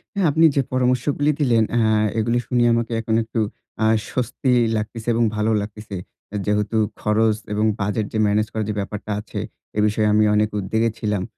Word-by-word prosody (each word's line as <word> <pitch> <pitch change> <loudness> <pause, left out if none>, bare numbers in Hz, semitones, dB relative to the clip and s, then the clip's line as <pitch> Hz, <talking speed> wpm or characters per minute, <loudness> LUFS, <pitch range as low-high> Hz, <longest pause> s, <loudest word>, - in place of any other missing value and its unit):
হ্যাঁ। 195 -4 +2
আপনি 160 +3 +4
যে 140 - +4
পরামর্শগুলো 130 +4 +1
দিলেন 120 -6 +3
এ্যা 110 -2 +3 0.3
এগুলি 115 +2 +1
শুনিয়ে 120 -1 +3
আমাকে 115 0 -1
এখন 110 0 -1
একটু 115 +1 -4 0.5
আ - - +4 0.2
স্বস্তি 125 +1 -1 0.3
লাগতেছে 110 +2 -5
এবং 120 - +2
ভালো 105 +1 +1
লাগতেছে। 105 0 -7 0.4
এ - - -4
যেহেতু 105 +1 0 0.2
খরচ 110 0 +2 0.2
এবং 105 +1 +1
বাজেট 105 +2 -1
যে - - -1
ম্যানেজ 105 +1 +2
করার 110 -1 -2
যে - - 0
ব্যাপারটা 105 +1 -5
আছে 105 - -6 0.4
এ - - +2
বিষয়ে 105 0 +1
আমি 110 0 +4
অনেক 105 0 +2
উদ্বেগে 110 +4 0
ছিলাম। 105 -3 -1
110 Hz, 180 wpm, -22 LUFS, 105-120 Hz, 0.5 s, আপনি